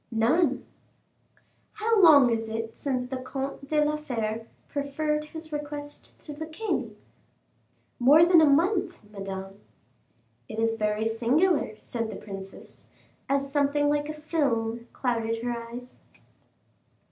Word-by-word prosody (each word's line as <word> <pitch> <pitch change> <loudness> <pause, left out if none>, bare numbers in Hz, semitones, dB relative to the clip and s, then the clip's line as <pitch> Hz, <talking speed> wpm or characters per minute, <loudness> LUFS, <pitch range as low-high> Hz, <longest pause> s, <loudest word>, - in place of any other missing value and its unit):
"None." 240 +10 +2 1.1
"How 435 0 +2
long 285 -8 +8
is 225 -1 -1
it 225 0 -4
since 255 -3 -2
the 260 +1 -4
Comte 270 +2 -5
de 300 0 +2
la 300 0 0
Fere 225 -6 -3 0.2
preferred 300 +2 -1
his 315 0 -9
request 295 0 -6
to 300 - -5
the 315 +2 -6
king?" 375 +8 -3 1.0
"More 290 +7 +7
than 345 -2 +6
a 310 - +6
month, 355 - +2
Madame." 195 -1 -6 0.9
"It 220 - -6
is 225 0 +2
very 215 0 0
singular," 245 - +2
said 230 -1 -4
the - - -6
princess, 195 -2 -10 0.4
as 275 0 0
something 290 0 +2
like 295 0 0
a - - -3
film 240 -7 -1
clouded 230 -2 -1
her 245 - -1 0.2
eyes. 245 +1 -10
275 Hz, 130 wpm, -27 LUFS, 225-305 Hz, 1.1 s, long